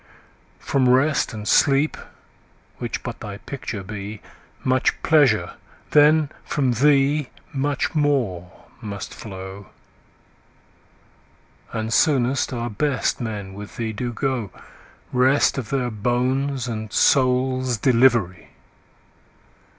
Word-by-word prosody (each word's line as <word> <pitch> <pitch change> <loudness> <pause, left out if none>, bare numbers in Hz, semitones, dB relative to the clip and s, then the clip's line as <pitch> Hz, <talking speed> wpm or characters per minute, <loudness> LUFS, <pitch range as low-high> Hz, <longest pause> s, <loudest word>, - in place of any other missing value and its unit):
From 130 -2 +1
Rest 135 +4 +3
and 105 -2 -7
Sleep, 140 +4 +3 0.8
which - - -4
but - - -6
thy 100 -1 -7
picture 110 -4 -6
be, 105 +1 -7 0.4
5 - - -24
Much 130 0 +1
pleasure, 125 - +3 0.4
then 150 0 +5
from 135 -4 0
thee 140 +2 +3 0.2
much 140 0 -1
more 125 - 0 0.3
must 100 -2 -6
flow; 95 -1 -9 2.0
And 110 0 -3
soonest 130 -2 +2
our 120 -2 -3
best 140 +4 -1
men 105 -4 -5
with 100 +1 -10
thee 110 -2 -3
do 120 +3 -3
go— 125 -4 -2 0.6
Rest 130 +2 +3
of 120 - -6
their 125 -3 -1
bones 125 +4 -1
and 110 -2 -5
souls' 130 -1 +2
delivery! 120 -7 +2
125 Hz, 105 wpm, -22 LUFS, 110-135 Hz, 2.0 s, then